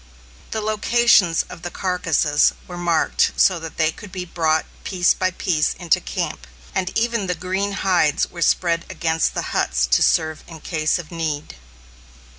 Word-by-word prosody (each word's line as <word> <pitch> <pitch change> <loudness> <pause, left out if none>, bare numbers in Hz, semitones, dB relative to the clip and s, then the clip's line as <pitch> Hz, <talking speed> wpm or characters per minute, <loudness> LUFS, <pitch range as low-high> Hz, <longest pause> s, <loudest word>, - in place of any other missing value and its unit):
The 220 - -3
locations 215 -4 +3
of - - -12
the 175 - -5
carcasses 165 -6 +1
were 180 - -8
marked 175 -2 +1
so 185 -3 +3
that 165 0 -9
they 160 -1 +2
could 205 +3 -12
be 180 -1 -5
brought 160 -2 0 0.2
piece 180 -3 +2
by 185 - 0
piece 175 -4 0
into 175 -3 +1
camp; 60 - -4 0.3
and 185 - -1
even 230 -3 0
the 180 - -1
green 190 +4 -2
hides 175 -7 +2
were 170 - -10
spread 170 -1 +2
against 160 -1 0
the - - -1
huts 60 +1 +1
to - - +2
serve 155 -1 +1
in 160 -2 -11
case 155 -1 0
of 175 -2 -9
need. 155 - -4
175 Hz, 165 wpm, -21 LUFS, 160-185 Hz, 0.3 s, locations